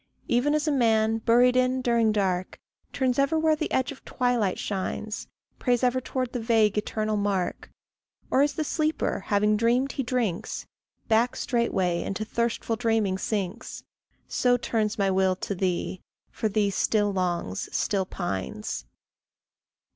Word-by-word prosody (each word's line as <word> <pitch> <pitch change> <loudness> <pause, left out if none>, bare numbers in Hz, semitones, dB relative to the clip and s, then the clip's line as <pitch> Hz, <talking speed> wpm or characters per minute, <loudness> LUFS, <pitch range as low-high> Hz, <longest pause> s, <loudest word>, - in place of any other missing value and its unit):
Even 255 +5 +2
as 305 +1 0
a - - +3
man, 225 -4 +2
buried 245 +2 +4
in 255 0 +2
during 235 -3 +2
dark, 185 -3 -1 0.3
Turns 260 -1 0
ever 280 +4 +2
where 315 0 +3
the 305 0 -3
edge 260 +1 +1
of 280 - -12
twilight 245 -7 0
shines, 210 +2 -4 0.3
Prays 245 -1 +1
ever 255 +1 +2
towards 255 -1 -3
the 245 - -3
vague 225 -2 +3
eternal 215 0 -1
mark; 200 -3 -1 0.6
Or 265 - +4
as 290 0 +2
the 310 - -1
sleeper, 310 +1 0
having 210 +1 +3
dreamed 245 +5 +2
he - - -2
drinks, 235 -8 -2 0.4
Back 230 +2 +3
straightway 190 -8 0
into 205 +2 -3
thirstful 235 0 -1
dreaming 220 -5 +1
sinks, 205 +2 -3 0.4
So 245 -1 +2
turns 225 -2 -1
my 195 -2 +2
will 190 0 +2
to 195 - -4
thee, 185 -1 -2 0.3
for 220 - -1
thee 205 -1 +1
still 205 +1 +1
longs, 175 - -2
still 195 -3 0
pines. 95 - -4
225 Hz, 145 wpm, -26 LUFS, 200-250 Hz, 0.6 s, buried